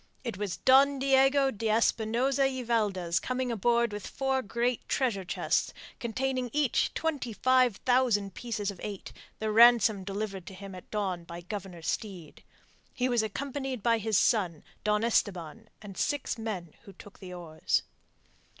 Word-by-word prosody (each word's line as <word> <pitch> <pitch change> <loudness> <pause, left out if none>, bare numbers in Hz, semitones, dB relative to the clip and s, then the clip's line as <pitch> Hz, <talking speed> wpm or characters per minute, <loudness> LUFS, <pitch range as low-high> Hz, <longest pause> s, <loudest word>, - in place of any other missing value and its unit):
It 235 -5 -4
was 200 -2 -3
Don 275 +2 +5
Diego 270 0 +4
de 220 0 -3
Espinosa 230 +5 +2
y 260 -1 -4
Valdez 195 -7 0
coming 255 +1 -2
aboard 235 +1 +1
with 205 - -6
four 265 -1 -1
great 235 +2 -2
treasure 235 -8 0
chests, 180 - -1 0.2
containing 255 +1 -2
each 295 -4 +1
twenty 290 -7 -2
five 255 +1 +3
thousand 240 -6 +2
pieces 215 -4 -3
of 190 - -13
eight, 205 -2 -6 0.2
the 220 0 -2
ransom 225 -3 +6
delivered 195 -1 -5
to 190 - -8
him 195 0 -9
at 185 - -11
dawn 190 -5 -2
by 170 +1 -8
Governor 180 -2 -7
Steed. 180 -5 -5 0.5
He 255 0 0
was 240 -2 +2
accompanied 265 +2 -4
by 230 -1 +3
his 220 -1 +1
son, 180 -9 +1 0.2
Don 210 +1 +1
Esteban, 185 -8 -1
and 200 -2 -8
by - - -9
six 290 -2 -1
men 200 -8 -5
who 200 - -12
took 200 +2 -15
the 185 -2 -9
oars. 160 -3 -1
220 Hz, 160 wpm, -29 LUFS, 195-255 Hz, 0.5 s, ransom